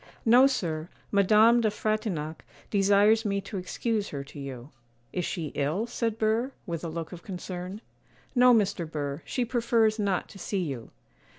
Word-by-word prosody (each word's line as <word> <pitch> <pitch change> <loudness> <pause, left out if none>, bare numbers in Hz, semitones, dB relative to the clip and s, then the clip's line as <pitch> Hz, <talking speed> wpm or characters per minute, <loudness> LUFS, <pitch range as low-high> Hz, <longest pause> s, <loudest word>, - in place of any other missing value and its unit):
'No, 245 +4 +7
sir; 165 -11 -2 0.2
Madame 215 +4 +5
de 220 - +3
Frontignac 205 -8 -2 0.3
desires 205 +2 +4
me 200 -1 0
to 200 +1 -6
excuse 210 +3 -2
her 140 -1 -5
to 145 +1 -11
you.' 135 0 -7 0.4
'Is 180 - -1
she 160 -5 -3
ill?' 155 +10 0
said 230 -2 -2
Burr, 225 +4 +1
with 170 -4 -4
a - - -2
look 165 0 -5
of 175 -2 -9
concern. 185 +1 -6 0.5
'No, 250 -1 +6
Mr. 200 -7 +2
Burr, 145 0 -3
she 250 - -1
prefers 230 -2 +2
not 200 -3 0
to 195 - -12
see 190 +1 -2
you. 135 -8 -5
200 Hz, 165 wpm, -28 LUFS, 165-225 Hz, 0.5 s, No